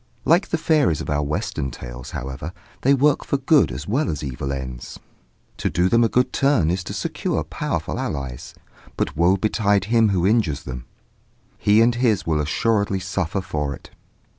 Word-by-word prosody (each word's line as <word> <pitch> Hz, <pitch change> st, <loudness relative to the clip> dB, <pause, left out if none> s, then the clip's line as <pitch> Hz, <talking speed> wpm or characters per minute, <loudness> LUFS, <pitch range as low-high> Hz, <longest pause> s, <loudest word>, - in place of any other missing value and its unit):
Like 170 Hz, +5 st, +4 dB
the 165 Hz, -, 0 dB
fairies 155 Hz, -, +2 dB
of -, -, -4 dB
our 75 Hz, 0 st, +1 dB
Western 70 Hz, -2 st, -2 dB
tales, -, -, -9 dB
however, 70 Hz, +6 st, -6 dB, 0.3 s
they 140 Hz, +2 st, +4 dB
work 145 Hz, +2 st, +3 dB
for 140 Hz, -, 0 dB
good 135 Hz, -, +3 dB
as 65 Hz, +4 st, -6 dB
well 135 Hz, +9 st, 0 dB
as 75 Hz, -, -3 dB
for -, -, -4 dB
evil 70 Hz, +1 st, -4 dB
ends. 65 Hz, -3 st, -6 dB, 0.6 s
To -, -, -1 dB
do 90 Hz, +3 st, +1 dB
them 115 Hz, +2 st, +4 dB
a 115 Hz, -, +3 dB
good 125 Hz, 0 st, +1 dB
turn 135 Hz, -, +3 dB
is 90 Hz, +1 st, -2 dB
to -, -, -5 dB
secure -, -, -2 dB
powerful -, -, -3 dB
allies; 65 Hz, -5 st, -5 dB, 0.4 s
but -, -, -1 dB
woe 85 Hz, +4 st, +3 dB
betide 100 Hz, -1 st, +1 dB
him 115 Hz, -2 st, +5 dB
who 90 Hz, -3 st, +1 dB
injures 95 Hz, -10 st, +1 dB
them! 65 Hz, -2 st, -7 dB, 0.7 s
he 105 Hz, +2 st, +4 dB
and 120 Hz, +1 st, +4 dB
his 115 Hz, -5 st, +1 dB
will 80 Hz, -2 st, +1 dB
assuredly 100 Hz, +6 st, +1 dB
suffer 95 Hz, 0 st, -2 dB
for 75 Hz, -5 st, -3 dB
it. -, -, -16 dB
95 Hz, 185 wpm, -22 LUFS, 70-115 Hz, 0.7 s, him